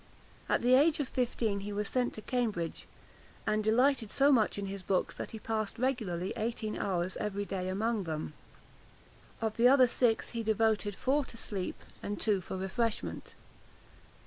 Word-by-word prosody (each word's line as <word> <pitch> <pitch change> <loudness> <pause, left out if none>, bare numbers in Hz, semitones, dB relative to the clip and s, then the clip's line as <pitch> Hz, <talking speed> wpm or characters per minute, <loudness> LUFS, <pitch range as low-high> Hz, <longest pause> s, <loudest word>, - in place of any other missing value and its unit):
At - - +2
the 250 +1 +5
age 295 +4 +5
of 285 - -1
fifteen 230 -5 -1
he 205 +1 -5
was 205 0 -2
sent 250 +1 0
to 215 - -8
Cambridge, 215 -10 -2 0.6
and 215 0 +1
delighted 240 +1 +3
so 280 +5 +4
much 225 -7 +3
in 200 - -3
his 195 0 -5
books, 185 0 0
that - - -6
he 220 - -7
passed 220 0 -3
regularly 220 -9 -1
eighteen 220 -1 -2
hours 185 -2 -1
every 205 -1 -2
day 185 -2 -3
among 210 +1 0
them. 155 -2 -4 1.1
Of 220 -1 -1
the 235 +1 +6
other 260 0 +7
six, 235 -2 +1
he 235 - -2
devoted 220 -2 +1
four 280 +6 +1
to 230 - -10
sleep 195 -4 -4 0.2
and 205 0 -4
two 210 -4 +2
for 190 - -5
refreshment. 210 +4 -2
215 Hz, 170 wpm, -31 LUFS, 200-240 Hz, 1.1 s, other